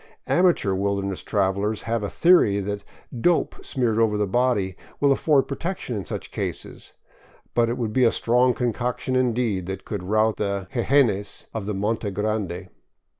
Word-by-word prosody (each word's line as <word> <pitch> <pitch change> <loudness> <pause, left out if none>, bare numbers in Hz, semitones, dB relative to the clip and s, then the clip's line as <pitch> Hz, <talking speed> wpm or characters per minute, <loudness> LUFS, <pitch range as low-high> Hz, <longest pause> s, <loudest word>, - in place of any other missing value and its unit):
Amateur 175 - +3
wilderness 100 0 -1
travelers 100 +1 0
have 115 -1 -1
a 100 - -3
theory 170 - +4
that 100 +1 -4 0.2
" 120 - -8
dope 175 - 0
" - - -13
smeared 120 -5 0
over 110 -2 +2
the 105 - +1
body 100 -3 +1 0.2
will 140 -1 +4
afford 140 0 +3
protec 170 +7 -3
tion 120 - -5
in 100 - -4
such - - -6
cases, - - -5 0.6
but 115 -1 +2
it 120 - -2
would 110 -3 -2
be 130 - +3
a 115 - +5
strong 125 +2 +2
concoction 125 +1 -1
indeed 120 -7 0
that 95 0 -5
could 100 -3 -4
rout 110 +4 +1
the 100 -2 -2
jejenes 120 -5 +1
of 110 -3 -4
the 105 - -2
Monte 105 +2 -1
Grande. 100 -3 -3
110 Hz, 175 wpm, -24 LUFS, 100-125 Hz, 0.6 s, a